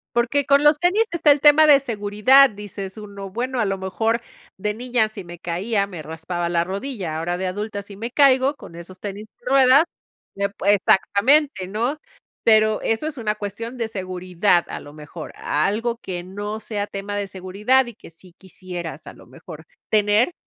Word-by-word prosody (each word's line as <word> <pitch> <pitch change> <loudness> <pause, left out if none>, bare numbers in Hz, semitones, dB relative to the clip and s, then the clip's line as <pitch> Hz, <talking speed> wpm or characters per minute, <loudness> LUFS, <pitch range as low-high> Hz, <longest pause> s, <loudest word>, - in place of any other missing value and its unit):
Porque 250 +4 +1
con 280 +1 +4
los 295 0 +5
tenis 360 +6 +3
está 325 -3 +4
el 285 -1 +3
tema 295 +1 +7
de 290 -2 +7
seguridad, 235 +3 +4
dices: 200 -1 -8
“Uno 200 -2 -9
bueno, 250 +4 -3
a 220 - +2
lo 195 -1 -2
mejor 220 +5 -1 0.4
de 210 +2 -2
niña 245 -1 0
si 210 -3 -9
me 175 -1 -11
caía, 200 +5 -1
me 175 -5 -8
raspaba 165 +3 -4
la 170 -1 +1
rodilla, 190 - -4
ahora 175 +2 -2
de 190 - -2
adulta 205 +2 -4
si 200 0 -12
me 230 +3 -5
caigo 275 0 +4
con 170 - -13
esos 180 +2 -11
tenis 205 +1 -6
de - - -27
ruedas 270 +2 +6 0.5
me 200 0 -1
pue 200 0 +1
"Exactamente, 205 +4 +2
¿no? 235 +9 -2 0.5
Pero 215 -1 +4
eso 225 +7 -1
es 305 -2 -6
una 215 -3 -1
cuestión 215 +4 -6
de 230 -2 -2
seguridad, 185 -2 0
a - - -6
lo 145 - -13
mejor, 155 +1 -9
algo 220 +10 -1
que 180 -6 -6
no 205 +4 -5
sea 210 -2 -3
tema 200 +1 -5
de 205 0 -2
seguridad 200 +8 +1
y 235 - -8
que - - -14
sí 175 +2 -16
quisieras, 180 -3 -8
a - - -8
lo - - -17
mejor, - - -12 0.2
tener. 210 +7 +3
205 Hz, 190 wpm, -22 LUFS, 185-245 Hz, 0.5 s, tema